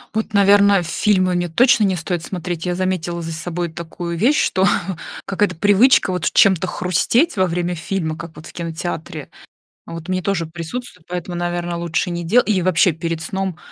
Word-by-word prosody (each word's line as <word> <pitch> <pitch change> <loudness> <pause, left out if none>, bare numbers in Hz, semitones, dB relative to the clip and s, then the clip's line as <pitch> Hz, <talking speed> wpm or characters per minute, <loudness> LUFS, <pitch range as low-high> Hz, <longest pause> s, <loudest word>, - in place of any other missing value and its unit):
Вот, 220 -1 -2
наверное, 200 -1 +5
фильмы 185 +1 +1
мне 175 -1 -1
точно 235 +3 +4
не 190 -1 +1
стоит 170 0 -3
смотреть. 175 -2 -4
Я 180 - 0
заметила 175 -2 -2
за 165 - -5
собой 170 +1 -3
такую 170 +1 -6
вещь, 245 - +3
что 190 +1 +2 0.6
какая-то 195 -2 0
привычка 205 +3 +4
вот 180 - -1
чем-то 190 -2 +4
хрустеть 185 - +1
во 185 - +4
время 175 +1 -2
фильма, 165 -1 -3
как 165 -1 -9
вот 155 +2 -11
в - - -11
кинотеатре, 165 -2 -5 0.6
вот 165 +1 -8
мне 185 0 -1
тоже 180 -4 -1
присутствуют, 170 +3 -7
поэтому, 180 0 -5
наверно, 175 0 -2
лучше 170 +1 -1
не 170 0 -3
дела 230 +9 +4
и 200 -4 +1
вообще 180 0 +3
перед 165 0 -4
сном 190 +1 -3
175 Hz, 175 wpm, -19 LUFS, 170-195 Hz, 0.6 s, наверное